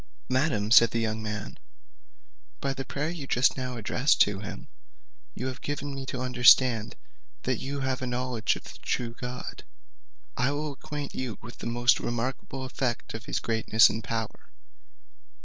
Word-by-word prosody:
"Madam," 130 -6 +1
said 115 -1 +8
the 115 - -1
young 110 -1 -1
man, 105 -1 -5 1.0
"by 135 -1 -1
the 135 - -4
prayer 145 +4 -3
you 155 -6 -6
just 125 +1 +3
now 125 -2 -4
addressed 125 +5 +2
to 100 -1 +4
him, 100 - -7 0.7
you 125 - -4
have 130 0 -4
given 145 0 -3
me 135 -1 -6
to 130 - -3
understand 125 -2 +5 0.5
that - - 0
you 140 +1 -4
have 130 -1 -1
a 130 - -2
knowledge 125 -2 0
of - - -9
the - - -11
true 120 -2 -2
God. 125 +1 -6 0.7
I 125 +3 +1
will 150 +1 -2
acquaint 145 +1 -6
you 130 -4 -4
with 120 +2 -10
the - - -4
most 120 +1 +3
remarkable 130 +2 -3
effect 130 -2 -2
of 110 0 -7
his - - -1
greatness 110 0 +4
and 110 +1 -4
power. 110 -1 -4
125 Hz, 165 wpm, -28 LUFS, 115-135 Hz, 1.0 s, said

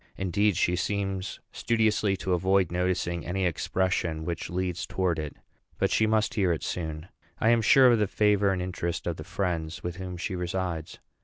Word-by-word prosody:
Indeed, 95 +1 +1
she 90 -1 +2
seems 95 +1 -2
studiously 110 -3 +1
to 95 0 -1
avoid 95 0 +2
noticing 90 -1 -1
any 95 +1 -1
expression 85 -1 -1
which 85 0 -4
leads 90 -1 -2
towards 90 -4 0
it; 75 - -7 0.4
but - - +1
she 110 - +3
must 110 0 +1
hear 95 -5 +2
it 80 - -2
soon. 80 -1 -4 0.3
I 110 - +3
am 120 -1 +4
sure 130 +3 +7
of 115 - +3
the 105 - +2
favor 105 -1 +3
and 90 -1 -1
interest 90 -1 -3
of 85 -2 -2
the 75 - -7
friends 85 -2 -3
with 90 0 -4
whom 90 -1 -6
she 95 +2 -3
resides. 90 -2 -3
90 Hz, 180 wpm, -27 LUFS, 85-100 Hz, 0.4 s, sure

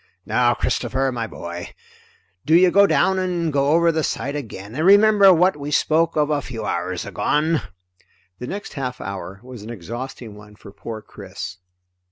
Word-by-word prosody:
"Now - - +2
Christopher, 135 0 -1
my 115 -2 -3
boy, 85 -3 -8 0.7
do 160 - +3
you 180 +1 +6
go 200 +2 +6
down 190 -1 +2
and 175 -4 -1
go 140 0 +2
over 170 +2 +4
the 160 -1 -1
side 140 0 -3
again, 110 -7 -7
and 155 +4 -2
remember 200 +1 +7
what 180 +1 +4
we 145 0 -6
spoke 160 +2 +2
of 150 -1 +1
a 145 -1 +1
few 115 -4 -6
hours 90 +1 -3
agone!" 155 +2 0 0.8
The 125 - -6
next 200 +6 -6
half 125 -3 -4
hour 95 0 -7
was 125 -3 -10
an 105 - -9
exhausting 120 +2 -7
one 105 0 -14
for 100 - -13
poor 110 +2 -8
Chris. 95 - -8
140 Hz, 175 wpm, -21 LUFS, 110-165 Hz, 0.8 s, remember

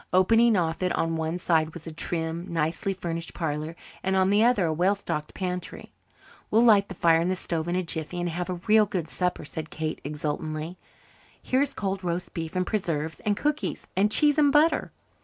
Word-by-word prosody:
Opening 225 +5 +5
off 165 -1 -1
it 180 -1 +1
on 165 0 0
one 160 +1 -2
side 160 -2 +1
was 170 - -9
a 165 - -6
trim, 165 +2 -3
nicely 165 +4 -1
furnished 165 -3 -4
parlour 155 0 -3 0.3
and 190 0 0
on 190 0 +3
the 210 +2 +4
other 235 -6 +3
a 160 - +1
well 180 +5 +2
stocked 150 -6 -4
pantry. 180 -1 -5 0.6
"We'll 225 +2 +4
light 205 -4 +5
the 190 - -6
fire 165 -1 +4
in 175 - 0
the 185 - +1
stove 165 -2 -3
in 175 - 0
a 185 - +1
jiffy 165 +1 -3
and 175 - -1
have 175 +2 -3
a 180 - -1
real 215 -1 +5
good 180 -5 -3
supper," 180 -4 -1
said 160 +1 -6
Kate 160 -1 -4
exultantly. 155 +3 -4 0.6
"Here's 270 +2 0
cold 195 -2 -2
roast 175 0 -3
beef 165 0 -5
and 185 0 +1
preserves 160 -7 -2
and 205 -1 0
cookies 300 0 -2
and 205 +3 +3
cheese 295 +4 +4
and 290 -2 +5
butter." 305 +3 +3
175 Hz, 200 wpm, -26 LUFS, 160-200 Hz, 0.6 s, Opening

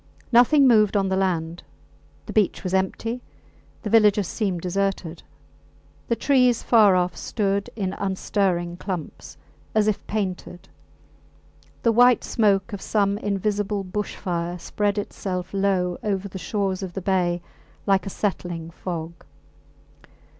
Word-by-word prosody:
Nothing 260 +4 +6
moved 215 -4 +4
on 195 -1 +1
the 190 - +1
land. 175 -3 -1 0.6
The - - -7
beach 210 -4 +1
was 185 -1 -3
empty, 225 +6 -1 0.6
the 215 - -3
villages 210 -3 +4
seemed 190 -6 -2
deserted; 185 -2 -2 0.9
the 235 - +1
trees 250 -3 +3
far 215 -5 +5
off 180 -1 +1
stood 200 -2 -1
in 195 -4 -2
unstirring 185 -3 -1
clumps, 180 -4 -6 0.4
as 215 -1 +3
if 215 - 0
painted; 185 -4 -4 1.1
the 230 - +4
white 245 +1 +5
smoke 205 -1 +1
of 200 - -5
some 200 -1 +1
invisible 205 0 -1
bush 200 +2 -4
fire 175 -1 -3
spread 205 +3 -1
itself 185 -2 -4
low 190 -3 0
over 200 -1 -2
the 190 -1 -8
shores 200 -4 -2
of 185 -2 -5
the 195 - -4
bay 180 -2 +1 0.5
like 195 0 +2
a - - -2
settling 175 -5 -3
fog. 170 -1 -5
195 Hz, 130 wpm, -24 LUFS, 180-210 Hz, 1.1 s, Nothing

